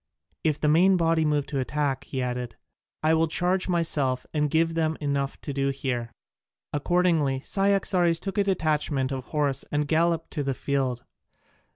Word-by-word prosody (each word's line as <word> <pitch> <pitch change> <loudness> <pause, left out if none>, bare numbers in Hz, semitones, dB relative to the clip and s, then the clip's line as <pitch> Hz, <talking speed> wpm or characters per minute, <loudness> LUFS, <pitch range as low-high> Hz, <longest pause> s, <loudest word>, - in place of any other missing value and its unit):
"If 150 -2 +1
the 150 - +1
main 180 +5 +5
body 165 -1 +2
move 150 -2 +1
to 140 0 -3
attack," 135 0 -1
he 130 -2 -3
added, 125 -1 -4 0.5
"I 155 +1 +4
will 160 0 +3
charge 180 +4 0
myself 145 -7 0
and 150 -1 +1
give 165 +2 +2
them 160 -1 0
enough 140 -2 -2
to 140 - -5
do 135 0 0
here." 125 -4 -3 0.6
Accordingly 155 -3 +2
Cyaxares 190 -2 +2
took 195 +1 -3
a - - +4
detachment 150 -7 0
of 130 -1 -4
horse 145 -3 0
and 150 0 0
galloped 165 +1 +1
to 150 - -2
the 135 -2 -1
field. 130 -3 -1
150 Hz, 165 wpm, -26 LUFS, 135-165 Hz, 0.6 s, main